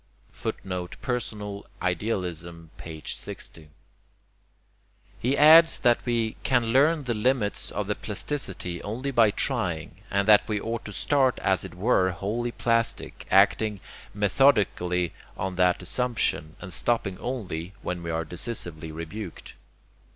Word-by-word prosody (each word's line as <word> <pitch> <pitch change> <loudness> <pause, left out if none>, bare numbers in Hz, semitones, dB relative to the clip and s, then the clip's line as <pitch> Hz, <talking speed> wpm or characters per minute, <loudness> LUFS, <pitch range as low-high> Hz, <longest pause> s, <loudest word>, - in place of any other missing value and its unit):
[Footnote: 90 -1 -5
Personal 105 -5 -3 0.2
Idealism, 90 -3 -3
p. 80 -2 -9
60.] 80 -2 -6 1.5
He 130 +4 +1
adds 160 +2 +8
that 120 -1 +3
we 115 -2 0
can 120 -3 +1
learn 150 +3 +4
the 125 -2 -1
limits 110 -1 0
of 105 - -3
the 105 - 0
plasticity 100 - -3
only 125 +7 -3
by 115 -4 +5
trying, 100 - -2
and 100 0 +1
that 105 -1 +6
we 105 -2 0
ought 115 +2 -4
to 105 - -6
start 130 +5 +2
as 95 -2 +2
if - - -8
it - - -15
were 95 -2 +3
wholly 105 +7 -2
plastic, 115 -1 -1
acting 105 -2 +4 0.3
methodically 100 - +2 0.2
on 95 0 -3
that 90 0 +3
assumption, 110 -8 -1
and 95 -3 -7
stopping 95 -2 0
only 95 -8 -4
when 90 -1 -3
we 85 - -5
are 80 0 -1
decisively 85 -3 -5
rebuked. 85 +4 -7
105 Hz, 130 wpm, -26 LUFS, 90-120 Hz, 1.5 s, adds